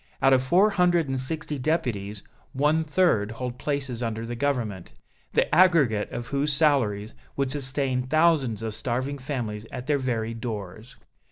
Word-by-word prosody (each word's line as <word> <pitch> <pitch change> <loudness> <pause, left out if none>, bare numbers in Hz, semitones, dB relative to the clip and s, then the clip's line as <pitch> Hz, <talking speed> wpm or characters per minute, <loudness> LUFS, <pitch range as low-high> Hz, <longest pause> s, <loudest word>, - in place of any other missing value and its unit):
Out 135 - +5
of 130 - +4
four 180 +11 +4
hundred 175 -4 +2
and 135 -1 -1
sixty 150 +2 -3
deputies, 120 - -2 0.3
one 150 +4 +2
third 150 - +2
hold 125 +1 -5
places 135 -5 -3
under 115 -1 -3
the 120 +1 -5
Government, 115 - -2 0.4
the - - +3
aggregate 150 - +4
of 120 - -6
whose 140 +2 0
salaries 120 -9 +1 0.2
would 135 -2 0
sustain 135 -2 -1
thousands 135 -5 +2
of 110 -1 -3
starving 130 +5 -2
families 115 -6 -4
at 125 0 -6
their 145 0 +1
very 115 -3 -2
doors. 110 -1 -6
130 Hz, 155 wpm, -26 LUFS, 115-150 Hz, 0.4 s, Out